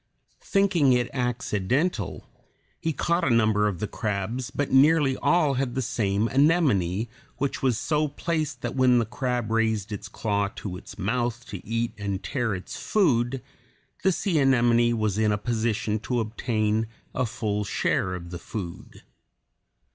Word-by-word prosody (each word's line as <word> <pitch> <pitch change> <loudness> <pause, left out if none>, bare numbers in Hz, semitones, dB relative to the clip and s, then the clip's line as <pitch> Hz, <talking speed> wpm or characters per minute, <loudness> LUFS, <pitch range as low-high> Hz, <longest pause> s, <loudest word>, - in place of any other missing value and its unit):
Thinking 185 -9 +3
it 120 -1 +1
accidental, 125 - -1 0.5
he 160 - -1
caught 170 +3 0
a - - +2
number 110 -3 +3
of 100 0 -2
crabs, 110 +4 -2
but 145 - -2
nearly 140 0 +5
all 165 -5 +3
had 130 -1 -1
the 130 - 0
small 105 -1 0
anemone, 125 - +2 0.3
which 140 0 -2
was 130 -4 +2
so 150 +5 +1
placed 150 -3 -2
that 120 +1 -3
when 130 -2 +5
the 115 - +2
crab 120 -1 -2
raised 110 -2 +1
its 105 - -5
claw 100 -2 0
to 95 -4 -5
its 90 - -10
mouth 120 +3 -1
to 100 -4 -7
eat 115 +2 -2
and 100 -2 -3
tear 120 -7 -1
its 90 - -7
food, 130 - +1 0.6
the 190 - +3
sea 180 -2 0
anemone 120 -3 +4
was 110 -2 0
in 110 -1 +3
a 105 - +1
position 110 -1 -1
to 120 +3 -1
obtain 110 -1 0 0.3
a 130 -2 0
full 105 -2 -2
share 95 -1 0
of 85 -1 -8
the 90 - -5
food. 90 -5 -7
120 Hz, 155 wpm, -26 LUFS, 105-135 Hz, 0.6 s, nearly